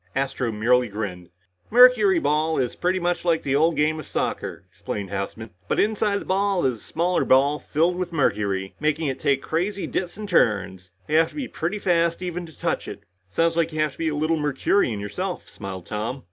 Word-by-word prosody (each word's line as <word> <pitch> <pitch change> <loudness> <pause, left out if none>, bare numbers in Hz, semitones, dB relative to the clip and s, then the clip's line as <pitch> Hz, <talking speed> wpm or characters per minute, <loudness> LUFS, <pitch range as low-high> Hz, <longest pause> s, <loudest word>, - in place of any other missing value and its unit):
Astro 135 -3 -1
merely 120 +3 +2
grinned. 100 -5 -5 0.4
"Mercuryball 190 - +5
is 125 -2 -1
pretty 185 +1 0
much 175 0 -1
like 170 -2 +1
the 135 -1 0
old 160 +3 +3
game 155 +1 +1
of - - -8
soccer," - - -3
explained 100 -2 -6
Houseman. 100 +3 -5 0.2
"But - - 0
inside 210 -1 +1
the - - -9
ball 195 -1 +1
is 125 -3 +1
a - - -14
smaller 175 +2 0
ball 140 +3 +3
filled 170 +4 0
with 180 -1 -3
mercury, 100 - 0
making 155 0 0
it 135 - -4
take 140 -1 +1
crazy 190 +5 -1
dips 180 0 -3
and 215 -1 -6
turns. 95 - +1 0.2
You 155 - +2
have 160 0 +4
to - - -17
be 280 -4 -3
pretty 175 +6 -3
fast 170 -3 +1
even 175 -1 -4
to 160 - -16
touch - - -1
it." - - -7 0.3
"Sounds 165 - +1
like 165 0 +1
you 155 - -5
have 155 -1 +2
to - - -19
be 165 -1 0
a 150 - -3
little 155 +2 +1
Mercurian 145 - +1
yourself," 180 - -4
smiled 95 -3 -8
Tom. 110 +5 -3
155 Hz, 200 wpm, -24 LUFS, 120-175 Hz, 0.4 s, Mercuryball